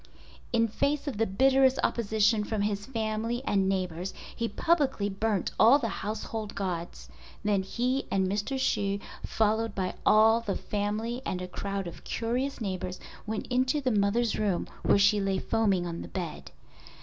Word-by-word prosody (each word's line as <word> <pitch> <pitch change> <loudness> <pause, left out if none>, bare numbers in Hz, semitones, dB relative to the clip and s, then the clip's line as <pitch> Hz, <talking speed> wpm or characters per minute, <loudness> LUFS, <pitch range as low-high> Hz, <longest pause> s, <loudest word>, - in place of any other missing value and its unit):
In 230 -1 +3
face 280 +7 0
of 270 - -3
the 225 - +2
bitterest 265 +5 +4
opposition 215 -1 +2
from 210 -1 -1
his 205 +1 -2
family 225 0 -2
and 195 -4 +2
neighbors 185 -1 -2 0.2
he 230 - -1
publicly 270 -4 +1
burnt 205 -1 -1
all 235 +6 +8
the 235 -6 -2
household 215 0 -4
gods. 170 - -4 0.4
Then 205 -2 +2
he 250 +7 -1
and 190 -1 +1
Mr. 210 +8 -1
Hsu 200 -6 +1 0.3
followed 220 0 0
by 185 -2 -1
all 220 +2 +5
the 205 -4 -2
family 215 +4 -2
and 185 - -2
a 180 - -5
crowd 195 +1 -4
of 170 - -9
curious 250 +4 -2
neighbors 185 -3 -4 0.3
went 215 0 -3
into 255 +3 +2
the 260 -3 0
mother's 215 +2 +1
room 200 -5 0
where - - +4
she 200 +1 +4
lay 195 -1 0
foaming 200 -3 +1
on 170 -1 -4
the - - -7
bed. 175 -5 -5
210 Hz, 160 wpm, -29 LUFS, 195-235 Hz, 0.4 s, all